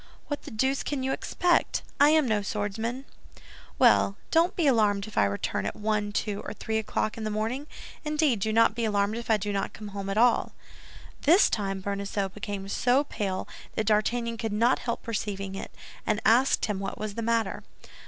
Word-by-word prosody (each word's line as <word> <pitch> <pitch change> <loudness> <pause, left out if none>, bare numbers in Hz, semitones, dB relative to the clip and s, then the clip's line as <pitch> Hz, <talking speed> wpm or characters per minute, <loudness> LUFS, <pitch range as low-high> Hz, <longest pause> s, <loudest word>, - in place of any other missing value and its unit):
What 290 - -3
the - - -9
deuce 265 +5 0
can 280 -3 -3
you 265 - 0
expect? 350 +4 +1 0.2
I 285 +1 +7
am 310 -3 +4
no 215 -2 +1
swordsman." 220 +6 -3 0.7
"Well, 200 - +4
don't 335 +3 +3
be 340 - +1
alarmed 210 -6 +3
if 215 - -11
I 100 - +4
return 100 0 -2
at - - -4
one, 210 -1 -1
two 205 -1 -2
or - - -5
three 220 +1 -2
o'clock 215 +1 -2
in - - -4
the 215 - -1
morning; 225 +7 -2 0.4
indeed, 300 -6 +1
do 220 +3 0
not 230 0 +4
be 235 +1 -3
alarmed 205 -1 +1
if 235 - -7
I 220 - +5
do 205 0 -3
not 195 - -2
come 200 -2 -6
at 195 - -2
all." 240 +1 +3 0.7
This 340 +8 +5
time 195 -2 -2
Bonacieux 200 0 -2
became 200 0 -6
so 250 +7 +2
pale 195 -9 -3 0.3
that 220 - 0
D'Artagnan 230 +2 +1
could 225 -2 -3
not 230 +4 +3
help 235 - -3
perceiving 200 -3 -3
it, 195 - -6 0.3
and 215 -1 0
asked 245 +5 +4
him 210 -3 -2
what 195 -1 -4
was 215 -1 -4
the 230 - -4
matter. 230 -3 0
215 Hz, 195 wpm, -27 LUFS, 200-240 Hz, 0.7 s, I